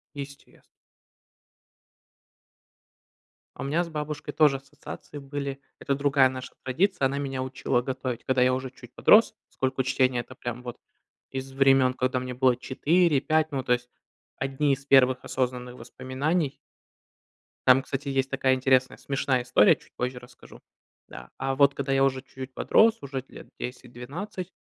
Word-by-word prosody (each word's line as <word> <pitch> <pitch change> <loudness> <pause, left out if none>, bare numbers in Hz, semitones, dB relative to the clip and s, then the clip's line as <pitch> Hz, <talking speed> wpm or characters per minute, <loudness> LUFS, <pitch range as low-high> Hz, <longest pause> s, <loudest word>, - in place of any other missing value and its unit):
Естест 140 0 -10 2.9
А - - -6
у - - -3
меня 155 +6 0
с - - -9
бабушкой 150 -1 -5
тоже 150 -3 +4
ассоциации 145 +1 -10
были. 140 0 -5 0.2
Это 140 - -1
другая 140 -1 +3
наша 130 0 -7
традиция: 170 +3 +1
она 140 +1 -1
меня 135 -2 -3
учила 130 -1 -1
готовить, 130 -2 -4
когда 130 -1 +2
я 130 - +4
уже 130 0 -3
чуть 125 -1 -15
подрос. 220 +2 +5
Поскольку 130 0 -1
чтения- 130 -1 +2
это 130 - -10
прям 120 -1 -6
вот 120 -1 -7 0.5
из 135 0 -6
времен, 135 -1 +4
когда 130 0 0
мне 125 0 -5
было 125 -1 +3
4-5. 155 +2 +1
Ну, 135 -2 -1
то 125 - 0
есть 125 0 0 0.5
одни 135 +2 0
из 135 - -13
первых 130 -2 +5
осознанных 125 -1 -3
воспоминаний. 130 +6 -2 1.1
Там, 130 +1 +7
кстати, 140 +2 -5
есть 135 -1 0
такая 130 -1 +2
интересная 130 0 +2
смешная 135 -2 -1
история, 120 -4 +5
чуть - - -24
позже 125 0 -3
расскажу, 125 0 -16 0.5
да. 60 0 -11
А 135 0 -1
вот 140 0 +5
когда 140 0 -2
я 135 0 +4
уже 130 -1 +1
чуть-чуть 130 -1 -9
подрос, 225 - +3
уже 135 -1 -5
лет - - -12
10-12, 135 - -7
135 Hz, 150 wpm, -26 LUFS, 130-140 Hz, 2.9 s, Там